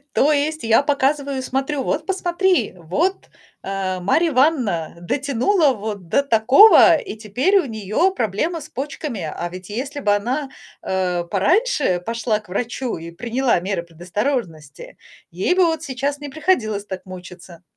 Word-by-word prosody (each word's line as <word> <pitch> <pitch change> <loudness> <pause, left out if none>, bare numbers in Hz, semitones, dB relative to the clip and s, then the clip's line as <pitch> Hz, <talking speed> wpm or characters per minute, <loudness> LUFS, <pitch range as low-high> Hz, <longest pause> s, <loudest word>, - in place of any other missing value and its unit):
То 300 +3 +4
есть 310 +2 0
я 225 +4 +4
показываю 280 -1 0
и 260 - -3
смотрю: 270 +2 -2
"Вот, - - -2
посмотри, 375 -1 +1
вот, 240 - -2 0.3
э, 190 -1 -3
Марья 320 - +2
Ивановна 250 - +1
дотянула 275 - +1
вот 205 -4 -6
до 280 - +2
такого, 265 - +7
и 420 - -6
теперь 245 - +1
у 355 - -1
неё 220 - 0
проблемы 310 - -2
с 295 - -10
почками. 275 - -5
А 160 +2 -4
ведь 185 0 -10
если 270 +7 -4
бы 205 -6 +2
она, 255 +8 -2 0.3
э, 180 -2 -1
пораньше 260 - +1
пошла 225 -1 -1
к 215 - -23
врачу 240 +5 -3
и 165 +1 -8
приняла 240 +2 0
меры 190 -1 -2
предосторожности, 175 - -4 0.3
ей 185 - 0
бы 365 -1 +4
вот 320 -1 -1
сейчас 280 0 -3
не 290 - -6
приходилось 245 - 0
так 190 -2 -7
мучиться". 180 -2 -11
245 Hz, 150 wpm, -20 LUFS, 190-295 Hz, 0.3 s, такого